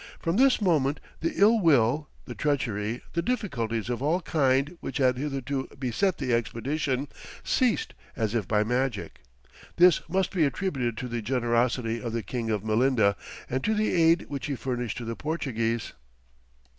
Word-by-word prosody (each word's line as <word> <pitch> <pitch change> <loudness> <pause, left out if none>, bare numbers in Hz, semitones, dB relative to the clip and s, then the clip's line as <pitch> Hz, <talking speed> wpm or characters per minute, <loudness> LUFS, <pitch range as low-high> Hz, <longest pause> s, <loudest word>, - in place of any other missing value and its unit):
From 170 +2 -1
this 265 +1 +5
moment 150 -8 +2 0.2
the 165 - -1
ill 220 +3 +6
will, 145 - +3 0.2
the 125 - -6
treachery, 120 -6 -1
the 170 - +1
difficulties 125 - -2
of 120 0 -3
all 155 +6 +2
kinds 140 -4 +1
which 135 - -5
had 130 -2 +3
hitherto 135 -1 -3
beset 135 - 0
the 130 -4 -1
expedition, 130 +4 -1 0.4
ceased 250 -4 +1 0.2
as 110 -3 -1
if 110 -6 -1
by 105 -1 +2
magic: 125 +3 -2 0.5
this 180 -1 +6
must 190 +1 0
be 180 -4 +2
attributed 135 - -1
to 125 - -4
the 120 -1 -3
generosity 120 0 0
of 115 -2 -4
the 115 -1 -2
King 120 -3 -3
of 105 -2 -1
Melinda, 110 -2 +3 0.3
and 130 +1 -2
to 220 - +1
the 215 +1 +1
aid 165 0 +4
which 140 -2 -4
he 140 - -2
furnished 125 -2 -3
to 120 - -5
the 115 0 -4
Portuguese. 115 -8 -2
130 Hz, 165 wpm, -27 LUFS, 115-160 Hz, 0.5 s, ill